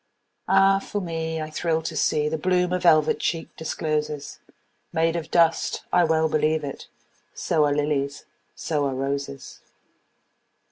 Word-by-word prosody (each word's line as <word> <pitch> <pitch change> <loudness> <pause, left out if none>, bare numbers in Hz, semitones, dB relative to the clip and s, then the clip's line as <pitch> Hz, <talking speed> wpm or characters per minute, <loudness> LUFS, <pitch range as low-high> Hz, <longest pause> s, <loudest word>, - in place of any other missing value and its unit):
Ah, 195 0 +5
for 205 - -4
me, 160 -3 -3
I 155 0 -5
thrill 160 0 -1
to 165 - -4
seeThe 150 0 0
bloom 180 0 +1
a 180 - +1
velvet 155 -4 +4
cheek 165 -1 -3
discloses, 150 -2 -3 0.5
Made 165 +1 +1
of 165 -1 -4
dust—I 170 +1 +2
well 160 0 +2
believe 155 0 +1
it! 140 -1 -7 0.5
So 155 -2 +1
are 145 -1 +1
lilies, 145 -1 -1 0.3
so 145 -3 -1
are 135 - -3
roses! 140 0 -4
160 Hz, 135 wpm, -24 LUFS, 150-170 Hz, 0.5 s, Ah